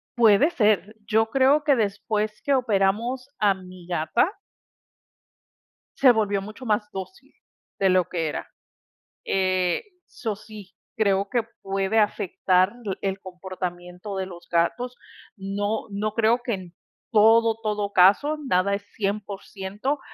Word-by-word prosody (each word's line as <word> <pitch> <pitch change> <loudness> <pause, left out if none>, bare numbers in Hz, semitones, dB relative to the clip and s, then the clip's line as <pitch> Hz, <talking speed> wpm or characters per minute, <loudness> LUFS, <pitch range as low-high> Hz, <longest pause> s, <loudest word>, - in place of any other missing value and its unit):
Puede 230 +4 +5
ser, 215 - +1
yo 220 +1 +3
creo 275 +3 +3
que 285 -3 +5
después 215 -1 -1
que 285 - +1
operamos 235 +1 +1
a 205 -2 +3
mi 185 -2 -12
gata 175 - +1 1.7
se 265 -2 +7
volvió 205 -3 +1
mucho 215 +6 -9
más 210 -1 0
dócil 190 - -9 0.5
de 195 - +3
lo 185 -1 +3
que 165 -3 -2
era. 150 - -4 0.8
Eh, 185 - +1 0.2
so 220 -4 -4
sí, 210 -2 -12 0.2
creo 200 -2 +2
que 240 -2 +1 0.2
puede 195 +2 0
afectar 190 -2 +2 0.3
el 195 0 -2
comportamiento 180 0 -7
de 190 0 -2
los 175 -2 -12
gatos. 245 +9 0 0.4
No 205 +2 -3
no, 205 +1 -2
creo 230 +2 +2
que 235 - -1
en 180 -3 -7 0.4
todo, 225 +1 +5
todo 210 -2 -2
caso, 200 +12 +5
nada 185 -1 +2
es 200 - -6
100%, 205 +4 -3
205 Hz, 130 wpm, -24 LUFS, 190-225 Hz, 1.7 s, se